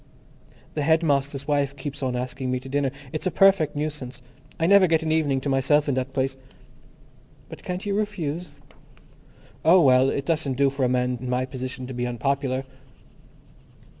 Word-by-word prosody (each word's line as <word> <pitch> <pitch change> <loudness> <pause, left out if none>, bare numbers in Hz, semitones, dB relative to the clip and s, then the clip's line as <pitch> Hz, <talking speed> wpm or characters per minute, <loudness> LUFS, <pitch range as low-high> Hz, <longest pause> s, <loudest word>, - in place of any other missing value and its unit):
"The 150 - -2
headmaster's 145 -3 +1
wife 140 -2 0
keeps 140 +1 -6
on 130 -2 -1
asking 130 +1 -3
me 125 0 0
to 130 - -11
dinner. 140 0 0 0.2
It's 155 +4 -2
a - - +3
perfect 185 -4 +4
nuisance. 145 -4 -4 0.4
I 165 - +2
never 195 +1 +6
get 160 -1 +2
an 160 - -1
evening 150 -4 +1
to 145 - -4
myself 140 +3 +2
in 140 - +1
that 130 +1 -2
place." 135 0 -1 1.1
"But - - -10
can't 180 +2 -5
you 200 - -1
refuse?" 180 -6 -2 1.2
"Oh, 170 +4 +6
well, 130 -4 +5
it 140 0 -2
doesn't 150 -5 -1
do 140 -1 +3
for 140 -1 -2
a 125 - +3
man 125 -1 0
in 125 - -5
my 125 +1 0
position 130 0 -6
to 130 - -7
be 125 0 -2
unpopular." 130 +2 -1
140 Hz, 175 wpm, -24 LUFS, 130-155 Hz, 1.2 s, never